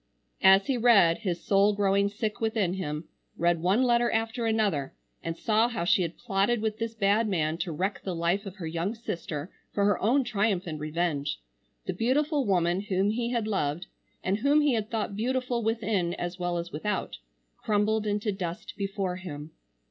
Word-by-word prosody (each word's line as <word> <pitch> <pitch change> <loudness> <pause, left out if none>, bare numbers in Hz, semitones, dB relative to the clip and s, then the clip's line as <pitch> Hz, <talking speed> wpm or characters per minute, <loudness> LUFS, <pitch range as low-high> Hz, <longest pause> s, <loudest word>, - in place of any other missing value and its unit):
As 190 +1 +7
he 265 - 0
read, 205 -8 +5
his 185 -6 -3
soul 200 +1 +4
growing 200 0 +2
sick 215 +2 -4
within 220 -5 +1
him,—read 170 0 -3
one 195 +8 +3
letter 240 -1 +3
after 225 +1 -1
another, 205 -11 0 0.3
and 165 0 -4
saw 220 +1 +2
how 230 -8 -3
she 195 +3 +3
had 170 -1 -3
plotted 215 +1 +1
with 215 0 -2
this 230 0 -3
bad 215 +1 +2
man 165 -4 0
to 180 - -2
wreck 190 +6 -2
the 185 -3 -4
life 175 +5 0
of 190 - -8
her 185 -4 -7
young 170 +7 -2
sister 170 -7 -5 0.2
for 200 - +1
her 205 -2 +2
own 260 +6 +3
triumph 210 -5 0
and 155 -3 -5
revenge,—the 150 - -4
beautiful 270 - +1
woman 175 -1 +2
whom 200 0 +1
he 235 +1 -1
had 235 -3 -1
loved, 175 -4 -1 0.4
and 190 +2 +1
whom 285 +5 +4
he 295 -3 +3
had 220 -2 -1
thought 215 -3 -2
beautiful 250 +2 -1
within 215 -6 0
as 175 +1 -5
well 175 -1 -1
as 170 0 -4
without, 185 - -3 0.4
crumbled 215 +1 +1
into 210 +1 0
dust 175 -3 -5
before 195 -2 -2
him. 155 -4 -8
200 Hz, 180 wpm, -28 LUFS, 175-225 Hz, 0.4 s, As